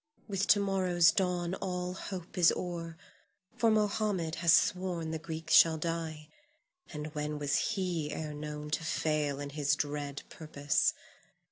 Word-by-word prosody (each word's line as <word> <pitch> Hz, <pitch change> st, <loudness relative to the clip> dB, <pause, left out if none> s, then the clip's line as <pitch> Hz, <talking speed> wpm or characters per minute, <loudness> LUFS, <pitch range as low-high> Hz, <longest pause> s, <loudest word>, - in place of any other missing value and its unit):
With 195 Hz, -2 st, -1 dB
to 205 Hz, -, +6 dB
morrow's 185 Hz, -4 st, +3 dB
dawn 180 Hz, -2 st, 0 dB
all 180 Hz, -1 st, -3 dB
hope 185 Hz, -2 st, -7 dB
is 175 Hz, -3 st, +5 dB
o'er, 170 Hz, -2 st, -5 dB, 0.6 s
for 230 Hz, -, +3 dB
Mohammed 210 Hz, -5 st, +1 dB
hath 170 Hz, 0 st, -1 dB
sworn 180 Hz, -3 st, +1 dB
the 160 Hz, -, -3 dB
Greek 160 Hz, 0 st, -6 dB
shall 160 Hz, -1 st, +7 dB
die, 160 Hz, -1 st, -4 dB, 0.6 s
and 150 Hz, -1 st, -6 dB
when 150 Hz, 0 st, -3 dB
was 145 Hz, -1 st, 0 dB, 0.2 s
he 175 Hz, -6 st, -2 dB
ere 155 Hz, -1 st, -4 dB
known 150 Hz, 0 st, -6 dB
to 150 Hz, -, -1 dB
fail 150 Hz, -3 st, 0 dB
in 145 Hz, 0 st, -5 dB
his 145 Hz, -1 st, +1 dB
dread 145 Hz, -1 st, -4 dB
purpose? 150 Hz, -2 st, 0 dB
165 Hz, 145 wpm, -31 LUFS, 150-180 Hz, 0.6 s, shall